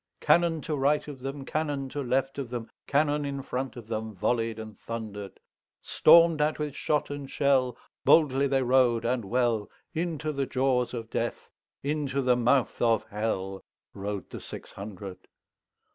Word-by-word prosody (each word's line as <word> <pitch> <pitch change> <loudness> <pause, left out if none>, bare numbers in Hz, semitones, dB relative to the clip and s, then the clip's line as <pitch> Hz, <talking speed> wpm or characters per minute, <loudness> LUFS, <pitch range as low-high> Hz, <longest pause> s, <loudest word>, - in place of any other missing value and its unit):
Cannon 170 -2 +3
to 155 - -2
right 145 +2 +2
of 145 -3 -8
them, 135 +1 -5
Cannon 145 -3 -2
to 145 +2 -4
left 135 +2 0
of 130 -4 -4
them, 120 -2 -5 0.2
Cannon 145 +1 +2
in 140 -1 -3
front 130 0 -3
of 120 -3 -9
themVolley'd 110 +1 -1
and 110 -1 -8
thunder'd; 105 -4 -7 0.4
Storm'd 165 -1 +6
at 150 +1 +1
with 150 -2 -3
shot 150 -1 0
and 145 -1 -6
shell, 135 -3 +2 0.3
Boldly 140 -3 +5
they 135 -1 +2
rode 125 -2 +3
and 120 0 0
well, 115 -1 +1 0.2
Into 160 -2 -2
the 140 -2 -2
jaws 125 -2 +1
of 115 -1 -6
Death, - - -3 0.3
Into 140 -1 -1
the 125 -1 +4
mouth 125 +2 +2
of 115 -3 +2
HellRode 100 -1 -4
the - - -7
six - - -9
hundred. 100 -2 -8
130 Hz, 155 wpm, -28 LUFS, 115-145 Hz, 0.4 s, Storm'd